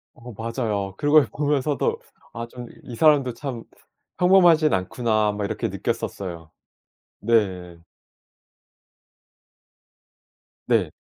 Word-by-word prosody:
어 120 Hz, -1 st, -11 dB
맞아요. 110 Hz, -3 st, -3 dB
그걸 145 Hz, -2 st, +4 dB
보면서도 145 Hz, 0 st, 0 dB, 0.4 s
아 115 Hz, 0 st, -6 dB
좀 120 Hz, 0 st, -10 dB, 0.2 s
'이 120 Hz, -, -8 dB
사람도 140 Hz, -2 st, +3 dB
참 125 Hz, -3 st, -6 dB, 0.5 s
평범하진 175 Hz, -4 st, +5 dB
않구나.' 110 Hz, +2 st, 0 dB
막 105 Hz, 0 st, -4 dB
이렇게 -, -, -2 dB
느꼈었어요. 85 Hz, -5 st, -5 dB, 0.7 s
네. 95 Hz, -6 st, 0 dB, 2.9 s
네. -, -, +2 dB
115 Hz, 190 characters per minute, -23 LUFS, 105-145 Hz, 2.9 s, 평범하진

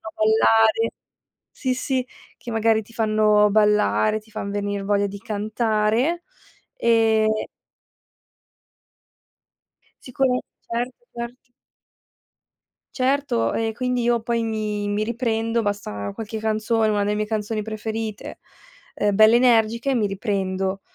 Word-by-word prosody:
ballare 225 Hz, +1 st, +3 dB, 0.6 s
sì, 260 Hz, -2 st, -2 dB
sì, 255 Hz, 0 st, -1 dB, 0.3 s
che 240 Hz, -, -8 dB
magari 225 Hz, 0 st, +2 dB
ti 225 Hz, +2 st, -19 dB
fanno 215 Hz, -2 st, +3 dB
ballare, 215 Hz, +1 st, +3 dB
ti 220 Hz, -, -23 dB
fan 210 Hz, -2 st, -5 dB
venir 205 Hz, -1 st, -3 dB
voglia 205 Hz, 0 st, +1 dB
di 200 Hz, 0 st, -7 dB
cantare. 220 Hz, -, 0 dB, 0.5 s
Ehm 220 Hz, -, +2 dB, 2.6 s
Sicura 255 Hz, 0 st, 0 dB, 0.3 s
certo, 240 Hz, +2 st, -2 dB, 0.2 s
cert 240 Hz, +1 st, -8 dB, 1.4 s
Certo 260 Hz, -, 0 dB
e 225 Hz, 0 st, -1 dB
quindi 250 Hz, +2 st, -1 dB
io 235 Hz, 0 st, +1 dB
poi 230 Hz, 0 st, -1 dB
mi 215 Hz, -2 st, -2 dB
mi 205 Hz, +1 st, 0 dB
riprendo, 230 Hz, -1 st, -1 dB
basta 155 Hz, -, -3 dB
qualche 220 Hz, 0 st, -6 dB
canzone, 220 Hz, +1 st, +1 dB
una 205 Hz, -1 st, +1 dB
delle 210 Hz, +1 st, 0 dB
mie 215 Hz, -, -1 dB
canzoni 215 Hz, 0 st, -2 dB
preferite 220 Hz, 0 st, -5 dB, 0.6 s
ehm, 205 Hz, -1 st, +1 dB
belle 220 Hz, +2 st, +7 dB
energiche, 235 Hz, +1 st, +3 dB
mi 220 Hz, -4 st, +1 dB
riprendo. 195 Hz, -1 st, -2 dB
220 Hz, 110 wpm, -23 LUFS, 210-235 Hz, 2.6 s, belle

